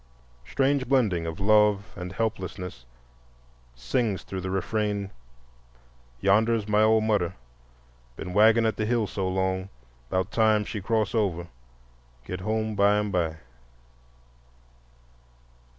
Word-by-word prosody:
Strange 135 - 0
blending 105 -11 +2
of 80 +2 -5
love 105 +1 +3
and 90 -1 -6
helplessness 95 - -4 0.9
sings 95 - -1
through 95 -1 -6
the 95 - -4
refrain: 100 +1 -2 1.1
"Yonder's 110 +2 +2
my 105 0 +3
ole 110 0 +4
mudder, 105 -5 0 0.8
Been 90 - -7
waggin' 110 +3 +5
at 110 - 0
de 110 - -1
hill 120 -2 +1
so 95 -1 -3
long; 95 0 -1 0.4
'Bout 95 +2 -1
time 110 -2 +3
she 105 -1 -5
cross 110 +1 0
over, 90 -7 -1 0.8
Git 90 +5 -5
home 110 +2 -1
bime 105 +1 +2
by." 85 -4 0
105 Hz, 115 wpm, -26 LUFS, 95-110 Hz, 1.1 s, waggin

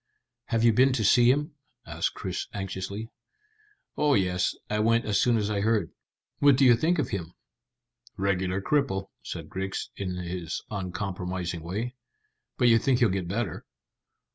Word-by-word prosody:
"Have 115 -1 0
you 115 -1 +6
been 130 +4 +4
to 120 -4 0
see 120 +4 +5
him?" 145 +4 +1 0.3
asked - - -2
Chris - - -4
anxiously. 100 +3 -5 0.8
"Oh 150 -1 +3
yes; 90 -2 +1
I 105 - -1
went 115 +2 +3
as 105 -2 +2
soon 120 -2 +3
as 105 -1 -1
I 100 -1 0
heard." 105 -5 +1 0.5
"What 140 -2 +6
do 135 - +5
you 120 -2 +7
think 165 +9 +1
of 145 -6 -1
him?" 90 -3 -5 0.8
"Regular 95 0 0
cripple," 135 -10 0
said 80 -2 -7
Griggs, 95 +3 -4
in 95 -2 -4
his 90 -1 -4
uncompromising 90 -3 -3
way. 105 +9 -4 0.6
"But 125 - +4
you 115 -1 +6
think 130 +2 +2
he'll 120 -3 +4
get 95 -2 -2
better?" 100 -1 -3
100 Hz, 160 wpm, -27 LUFS, 95-120 Hz, 0.8 s, you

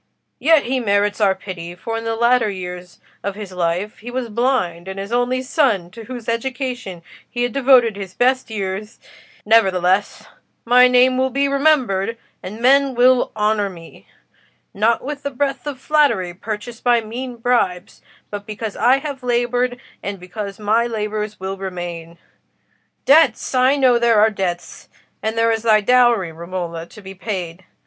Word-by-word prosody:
Yet 315 0 +4
he 260 +1 -1
merits 205 -1 +1
our 195 -2 +3
pity, 175 -3 -8
for 225 +5 -5
in 225 0 -4
the 225 0 -1
latter 235 -1 +3
years 180 -2 -7 0.2
of 200 -1 -3
his 205 -2 -8
life 180 +3 -2
he 235 - -8
was 245 -1 -4
blind, 205 -8 -1
and 190 0 -6
his 200 +2 -6
only 245 +2 0
son, 240 - +1
to 225 +2 -11
whose 245 -2 -8
education 245 -6 -3 0.3
he 240 0 -2
had 245 - -1
devoted 255 -5 +4
his 195 -2 -8
best 255 0 +1
years—' 205 +1 -5 0.5
Nevertheless, 195 -3 +2 0.4
my 250 +1 +6
name 250 +1 +4
will 260 0 +2
be 275 +2 +1
remembered, 260 -8 +1 0.2
and 205 +4 -8
men 270 +2 +4
will 250 +1 +4
honour 210 -1 +1
me: 170 -3 -14 0.7
not 225 +3 +1
with 285 +2 -5
the 280 - -3
breath 275 +1 -2
of 280 -3 -5
flattery, 260 - +1
purchased 220 +5 -7
by 240 -1 +3
mean 245 +3 -6
bribes, 230 -7 -1 0.3
but 205 0 -6
because 215 0 -5
I 255 +3 +4
have 275 -1 -6
laboured, 245 0 0 0.2
and 200 -1 -5
because 195 +2 -7
my 220 +3 +1
labours 215 -1 -4
will 190 +1 -4
remain. 175 -3 -6 0.9
Debts! 280 -5 +4
I 255 +2 +4
know 255 -4 +4
there 235 -2 +4
are 220 +1 +5
debts; 180 -4 -5 0.3
and 220 +1 -2
there 230 0 +3
is 225 0 -1
thy 215 -2 +4
dowry, 235 -5 +3
Romola, 170 0 -6
to 215 - -14
be 190 0 -9
paid. 185 -3 -5
225 Hz, 165 wpm, -19 LUFS, 190-250 Hz, 0.9 s, my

